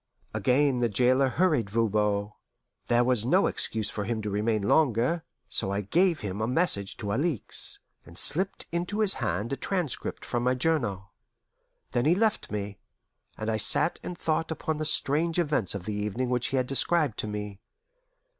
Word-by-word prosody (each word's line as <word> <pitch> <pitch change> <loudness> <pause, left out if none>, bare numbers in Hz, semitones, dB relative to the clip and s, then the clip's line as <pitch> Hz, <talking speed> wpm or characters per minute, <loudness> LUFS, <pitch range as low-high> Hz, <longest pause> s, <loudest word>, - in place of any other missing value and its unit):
Again 135 0 +2
the 120 -1 +1
jailer 130 +5 +3
hurried 150 - +1
Voban; 105 -1 0 0.6
There 120 0 +3
was 125 -3 +2
no 180 +11 +3
excuse 110 -2 +1
for 105 - -3
him 115 -1 -2
to 105 - -3
remain 105 +1 0
longer; 130 +6 +2 0.2
so 95 - -2
I 100 +1 -1
gave 170 - +2
him 100 0 -4
a 110 - 0
message 125 - +1
to 105 -3 -4
Alixe, 145 - +1 0.3
and - - -15
slipped 190 +5 +1
into 175 +5 -2
his 200 -2 +5
hand 105 +4 -1
a - - -2
transcript 175 -2 -3
from 120 - -2
my 125 +1 +2
journal. 115 -10 -1 0.8
Then 120 +1 0
he 165 +4 +4
left 220 +2 0
me, 100 -1 -4 0.6
and 110 +1 -2
I 110 - 0
sat 160 - +2
and 180 - -6
thought 160 -1 -1
upon 160 -1 -3
the 155 - -2
strange 155 +2 +1
events 145 - 0
of 95 -3 -6
the 105 - -3
evening 105 +5 -2
which 125 -1 +1
he 135 - -1
had 130 - +1
described 140 -1 +2
to - - -2
me. 105 -1 -5
125 Hz, 175 wpm, -27 LUFS, 105-160 Hz, 0.8 s, his